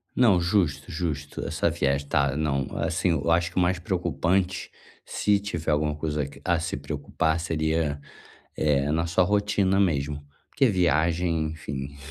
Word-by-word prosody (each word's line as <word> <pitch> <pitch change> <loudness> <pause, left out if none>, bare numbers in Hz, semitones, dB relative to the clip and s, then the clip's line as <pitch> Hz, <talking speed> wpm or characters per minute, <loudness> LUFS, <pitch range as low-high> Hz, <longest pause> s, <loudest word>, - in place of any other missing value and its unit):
Não, 105 -8 +4
justo, 85 -4 0
justo, 75 -4 -4
essa - - 0
viagem 70 0 0
tá 70 -1 +1
não 70 -3 0
assim, 85 +2 +1
eu 80 +1 0
acho 85 +1 +2
que - - -21
o - - +5
mais 90 0 +1
preocupante, 90 +1 -1 0.4
se 105 -1 +1
tiver 85 -6 -3
alguma 75 0 +1
coisa 75 -2 -2
que, 70 -1 -14
a 85 -2 +2
se 85 0 -3
preocupar, 75 +3 -1
seria, 80 -2 0 0.6
eh, 75 -1 +2
na 80 +2 0
sua 90 +2 +3
rotina 100 -1 +2
mesmo, 75 -5 0 0.2
porque 135 - +3
viagem, 85 -3 +1
enfim, 70 -3 -6
80 Hz, 155 wpm, -26 LUFS, 75-90 Hz, 0.6 s, o